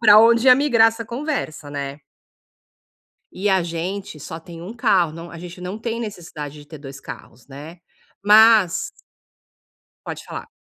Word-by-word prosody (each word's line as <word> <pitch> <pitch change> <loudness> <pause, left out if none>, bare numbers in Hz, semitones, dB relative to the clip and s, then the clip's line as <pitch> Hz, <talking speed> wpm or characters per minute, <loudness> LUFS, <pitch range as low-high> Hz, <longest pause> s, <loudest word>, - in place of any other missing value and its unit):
pra 215 -1 +8
onde 230 +2 +4
ia 255 - +9
migrar 245 -5 +4
essa 225 +1 -6
conversa, 235 - -4
né. 140 0 -5 1.3
E 200 +2 -1
a 190 -1 +3
gente 170 +1 -5
só 160 +3 -7
tem 165 0 -11
1 190 +6 -8
carro, 195 - +2
não 165 +2 -9
a 170 - -9
gente 180 +1 -10
não 180 +3 -5
tem 230 +1 -4
necessidade 160 -9 -7
de 145 - -15
ter 155 - -10
2 135 -1 -10
carros, 120 0 -11
né, 150 +5 -11 0.4
mas 210 -3 +5 1.2
Pode - - -6
falar. - - -8
180 Hz, 160 wpm, -21 LUFS, 160-225 Hz, 1.3 s, ia